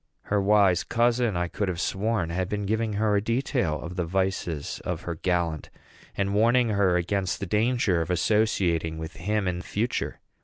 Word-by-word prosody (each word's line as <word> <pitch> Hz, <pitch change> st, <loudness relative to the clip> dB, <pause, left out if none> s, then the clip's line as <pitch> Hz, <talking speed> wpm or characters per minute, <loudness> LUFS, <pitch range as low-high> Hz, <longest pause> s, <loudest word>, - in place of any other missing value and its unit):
Her 105 Hz, -1 st, 0 dB
wise 100 Hz, -2 st, +4 dB
cousin, 120 Hz, -3 st, +1 dB
I 85 Hz, 0 st, 0 dB
could 100 Hz, +4 st, -2 dB
have 90 Hz, -2 st, -2 dB
sworn, 95 Hz, -3 st, -1 dB
had 90 Hz, +1 st, -2 dB
been 105 Hz, -1 st, -2 dB
giving 110 Hz, +1 st, 0 dB
her 105 Hz, 0 st, +1 dB
a 100 Hz, -, +2 dB
detail 115 Hz, -, 0 dB
of 85 Hz, +3 st, -7 dB
the 90 Hz, -, +1 dB
vices 90 Hz, -4 st, -2 dB
of -, -, -3 dB
her 85 Hz, -, -4 dB
gallant, 85 Hz, -2 st, -1 dB, 0.5 s
and 100 Hz, 0 st, 0 dB
warning 120 Hz, +3 st, +3 dB
her 100 Hz, -4 st, +2 dB
against 95 Hz, +2 st, -1 dB
the -, -, -3 dB
dangers 105 Hz, -2 st, +1 dB
of 80 Hz, -, -3 dB
associating 90 Hz, -5 st, +1 dB
with 80 Hz, +1 st, -7 dB
him 105 Hz, +2 st, -1 dB
in 90 Hz, -1 st, -2 dB
future. 110 Hz, +6 st, -2 dB
100 Hz, 180 wpm, -26 LUFS, 85-110 Hz, 0.5 s, wise